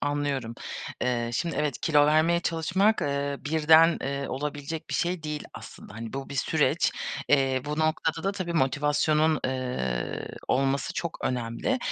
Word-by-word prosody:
anlıyorum. 145 Hz, -5 st, -1 dB, 0.5 s
Eee, 120 Hz, -2 st, 0 dB
şimdi 165 Hz, +8 st, -1 dB
evet, 150 Hz, -4 st, -1 dB
kilo 150 Hz, -2 st, +4 dB
vermeye 160 Hz, +3 st, +3 dB
çalışmak, 185 Hz, +7 st, +1 dB
eee, 140 Hz, 0 st, -1 dB
birden, 160 Hz, +2 st, +5 dB
eee, 140 Hz, 0 st, -3 dB
olabilecek 145 Hz, +3 st, -4 dB
bir -, -, -2 dB
şey 175 Hz, -1 st, 0 dB
değil 150 Hz, -1 st, -4 dB
aslında. -, -, -11 dB
Hani, 115 Hz, 0 st, -7 dB
bu 135 Hz, 0 st, -5 dB
bir -, -, -7 dB
süreç. 135 Hz, -, +1 dB, 0.4 s
Eee, 135 Hz, -2 st, +3 dB
bu 150 Hz, +1 st, -3 dB
noktada 160 Hz, +1 st, 0 dB
da 195 Hz, -, +1 dB
tabii 185 Hz, -4 st, -4 dB
motivasyonun, 150 Hz, +1 st, +2 dB
eee, 125 Hz, -, -2 dB, 0.2 s
olması 135 Hz, +1 st, +1 dB
çok 170 Hz, -1 st, -3 dB
önemli. 125 Hz, -, -1 dB
145 Hz, 145 wpm, -27 LUFS, 135-160 Hz, 0.5 s, birden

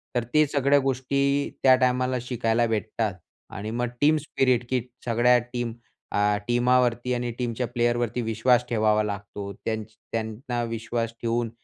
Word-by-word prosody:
तर 120 Hz, -, +1 dB
ते 155 Hz, 0 st, +5 dB
सगळ्या 140 Hz, 0 st, +3 dB
गोष्टी 140 Hz, +1 st, 0 dB
त्या 130 Hz, -1 st, +8 dB
टाईमला 130 Hz, 0 st, +1 dB
शिकायला 120 Hz, -1 st, 0 dB
भेटतात. 110 Hz, -1 st, -1 dB, 0.4 s
आणि 105 Hz, +3 st, -6 dB
मग 120 Hz, +1 st, -1 dB
टीम 155 Hz, +2 st, +5 dB
स्पिरिट, 130 Hz, -4 st, +1 dB
की 130 Hz, -2 st, +1 dB, 0.2 s
सगळ्या 120 Hz, +1 st, +4 dB, 0.2 s
टीम 120 Hz, -2 st, -2 dB, 0.4 s
अ, -, -, -3 dB, 0.3 s
टीमावरती 125 Hz, 0 st, +2 dB
आणि 120 Hz, -1 st, -2 dB
टीमच्या 125 Hz, 0 st, -2 dB
प्लेयरवरती 120 Hz, 0 st, 0 dB
विश्वास 115 Hz, +2 st, +2 dB
ठेवावा 110 Hz, -2 st, +2 dB
लागतो. 100 Hz, -1 st, -5 dB
त्यांच 110 Hz, -1 st, -2 dB, 0.3 s
त्यांना 115 Hz, +2 st, -3 dB
विश्वास 115 Hz, 0 st, -3 dB
ठेवून 115 Hz, 0 st, 0 dB
120 Hz, 140 wpm, -25 LUFS, 115-125 Hz, 0.4 s, त्या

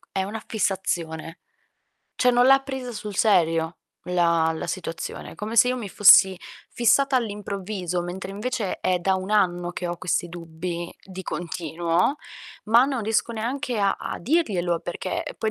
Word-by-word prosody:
è 190 Hz, -, -1 dB
una 210 Hz, +3 st, -5 dB
fissazione. 170 Hz, -5 st, -2 dB, 0.8 s
Cioè 250 Hz, -, +4 dB
non 245 Hz, +1 st, +4 dB
l'ha 270 Hz, 0 st, +7 dB
presa 265 Hz, -3 st, -6 dB
sul 210 Hz, -2 st, -6 dB
serio 165 Hz, -5 st, +2 dB, 0.3 s
la 170 Hz, -2 st, +2 dB
la 160 Hz, -, -5 dB
situazione, 170 Hz, -2 st, -5 dB
come 220 Hz, +2 st, -5 dB
se 250 Hz, -, +7 dB
io 255 Hz, -, 0 dB
mi 215 Hz, -5 st, -5 dB
fossi 190 Hz, -1 st, +7 dB, 0.4 s
fissata 260 Hz, +3 st, +3 dB
all'improvviso, 200 Hz, -5 st, -3 dB
mentre 185 Hz, +2 st, -6 dB
invece 220 Hz, 0 st, -3 dB
è 180 Hz, -1 st, +1 dB
da 190 Hz, +2 st, +1 dB
1 185 Hz, +1 st, -4 dB
anno 175 Hz, -4 st, +1 dB
che 175 Hz, -, -4 dB
ho 175 Hz, -, -3 dB
questi 175 Hz, -1 st, -1 dB
dubbi 170 Hz, +1 st, -6 dB
di 190 Hz, -1 st, -8 dB
continuo, 170 Hz, -, -1 dB, 0.5 s
ma 230 Hz, +4 st, +5 dB
non 265 Hz, -5 st, -2 dB
riesco 225 Hz, +2 st, 0 dB
neanche 245 Hz, +2 st, -3 dB
a 200 Hz, -1 st, +2 dB
a -, -, -5 dB
dirglielo, 185 Hz, -, 0 dB
perché, 175 Hz, +1 st, -4 dB
ehm, -, -, -7 dB
poi 220 Hz, -, 0 dB
190 Hz, 160 wpm, -24 LUFS, 175-225 Hz, 0.8 s, l'ha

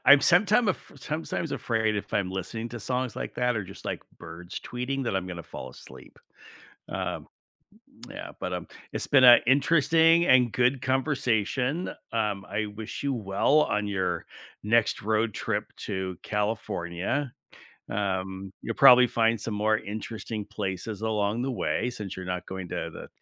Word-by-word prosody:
I'm 140 Hz, +1 st, +9 dB
sometime 205 Hz, +7 st, +4 dB
af 185 Hz, -, -3 dB
sometimes 155 Hz, +2 st, -4 dB
afraid 110 Hz, -2 st, 0 dB
if 100 Hz, 0 st, -5 dB
I'm 95 Hz, -2 st, 0 dB
listening 110 Hz, +5 st, -4 dB
to 120 Hz, -, -7 dB
songs 125 Hz, +1 st, -2 dB
like -, -, -5 dB
that, 125 Hz, -1 st, +1 dB
or 100 Hz, -, -2 dB
just 95 Hz, -, -12 dB
like -, -, -3 dB, 0.2 s
birds 90 Hz, +2 st, -8 dB
tweeting 130 Hz, +2 st, -3 dB
that 105 Hz, -, 0 dB
I'm 95 Hz, -1 st, -2 dB
gonna 85 Hz, -2 st, -6 dB
fall -, -, -8 dB
asleep. -, -, -14 dB, 0.7 s
Um, -, -, -4 dB, 0.8 s
yeah, -, -, -7 dB
but, -, -, -3 dB
um, -, -, -4 dB, 0.3 s
it's -, -, -3 dB
been 135 Hz, -2 st, +5 dB
a 120 Hz, -1 st, +10 dB
interesting 165 Hz, +4 st, +4 dB
and 125 Hz, -3 st, +5 dB
good 125 Hz, +3 st, +2 dB
conversation, 130 Hz, -, 0 dB, 0.2 s
um, 105 Hz, -3 st, -1 dB
I 105 Hz, +2 st, -2 dB
wish 105 Hz, +2 st, -7 dB
you 140 Hz, -1 st, 0 dB
well 110 Hz, +7 st, +2 dB
on 105 Hz, -5 st, 0 dB
your 95 Hz, -4 st, -1 dB, 0.4 s
next 115 Hz, +1 st, +2 dB
road 110 Hz, +1 st, +1 dB
trip -, -, -1 dB, 0.2 s
to 95 Hz, -2 st, -3 dB
California. 105 Hz, +3 st, -2 dB, 0.6 s
Um, 95 Hz, -1 st, -3 dB
you'll 115 Hz, -, -3 dB
probably 125 Hz, -2 st, +8 dB
find 115 Hz, -2 st, +1 dB
some 110 Hz, -, -4 dB
more 110 Hz, +1 st, +2 dB
interesting 110 Hz, +1 st, -5 dB
places 100 Hz, 0 st, -4 dB
along 110 Hz, 0 st, 0 dB
the 135 Hz, -, -1 dB
way 120 Hz, -1 st, -1 dB
since 105 Hz, -5 st, -6 dB
you're 95 Hz, 0 st, -6 dB
not 90 Hz, -1 st, -3 dB
going 95 Hz, -2 st, -6 dB
to -, -, -4 dB
the -, -, -9 dB
110 Hz, 160 wpm, -27 LUFS, 100-130 Hz, 0.8 s, a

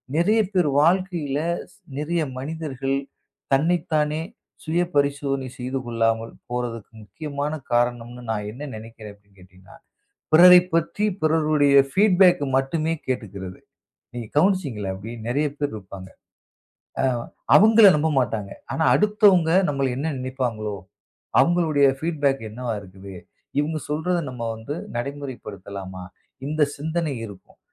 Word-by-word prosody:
நிறைய 205 Hz, +7 st, +3 dB
பேர் 180 Hz, -5 st, +2 dB
வாழ்க்கையிலே, 170 Hz, -4 st, +1 dB, 0.2 s
ஸ் 205 Hz, -, -23 dB, 0.2 s
நிறைய 165 Hz, +3 st, -1 dB, 0.2 s
மனிதர்கள் 135 Hz, -2 st, -3 dB, 0.6 s
தன்னைத்தானே 155 Hz, 0 st, +1 dB, 0.4 s
சுய 170 Hz, +2 st, +1 dB
பரிசோதனை 140 Hz, -1 st, 0 dB
செய்து 130 Hz, +2 st, -3 dB
கொள்ளாமல் 115 Hz, -1 st, 0 dB, 0.2 s
போறதுக்கு 120 Hz, -3 st, -4 dB
முக்கியமான 145 Hz, +4 st, -5 dB, 0.2 s
காரணம்ன்னு 120 Hz, 0 st, -1 dB
நான் 105 Hz, -1 st, -3 dB
என்ன 130 Hz, +6 st, -9 dB
நினைக்கிறேன் 110 Hz, -1 st, -10 dB
அப்படின்னு 100 Hz, -1 st, -28 dB
கேட்டீங்கன்னா, 95 Hz, 0 st, -18 dB, 0.6 s
பிறரைப் 180 Hz, +2 st, +8 dB
பற்றி 170 Hz, +5 st, 0 dB, 0.2 s
பிறருடைய 155 Hz, -3 st, +3 dB, 0.2 s
பீட்பேக் 185 Hz, -4 st, +5 dB, 0.2 s
மட்டுமே 155 Hz, +4 st, -1 dB
கேட்டுக்கிறது. 100 Hz, -7 st, -5 dB, 0.5 s
நீங்கள் 120 Hz, -3 st, -7 dB
கவனிச்சீங்களா? 145 Hz, -, +1 dB
அப்படி 110 Hz, +5 st, -8 dB, 0.2 s
நிறைய 145 Hz, +5 st, +1 dB
பேர் 145 Hz, -4 st, -2 dB
இருப்பாங்க. 95 Hz, -2 st, -10 dB, 0.9 s
ஆ. -, -, +1 dB, 0.5 s
அவங்கள 220 Hz, +1 st, +7 dB
நம்ப 155 Hz, +2 st, +1 dB
மாட்டாங்க. 105 Hz, -5 st, -3 dB, 0.2 s
ஆனா 160 Hz, -, 0 dB
அடுத்தவங்க 205 Hz, -5 st, +4 dB, 0.2 s
நம்மள 140 Hz, -2 st, 0 dB
என்ன 150 Hz, +4 st, -2 dB
நினைப்பாங்களோ, 120 Hz, -5 st, -3 dB, 0.6 s
அவங்களுடைய 160 Hz, -5 st, +3 dB
பீட்பேக் 145 Hz, -4 st, 0 dB
என்னவா 120 Hz, +2 st, -4 dB
இருக்கிது, 95 Hz, 0 st, -12 dB, 0.5 s
இவங்க 155 Hz, +2 st, -2 dB
சொல்றத 175 Hz, +4 st, 0 dB
நம்ம 125 Hz, -2 st, -7 dB
வந்து 110 Hz, +6 st, -6 dB, 0.2 s
நடைமுறைப்படுத்தலாமா? 100 Hz, -8 st, -6 dB, 0.4 s
இந்தச் 150 Hz, -1 st, 0 dB
சிந்தனை 160 Hz, 0 st, -2 dB
இருக்கும். 100 Hz, -3 st, -14 dB
140 Hz, 115 wpm, -23 LUFS, 115-160 Hz, 0.9 s, பிறரைப்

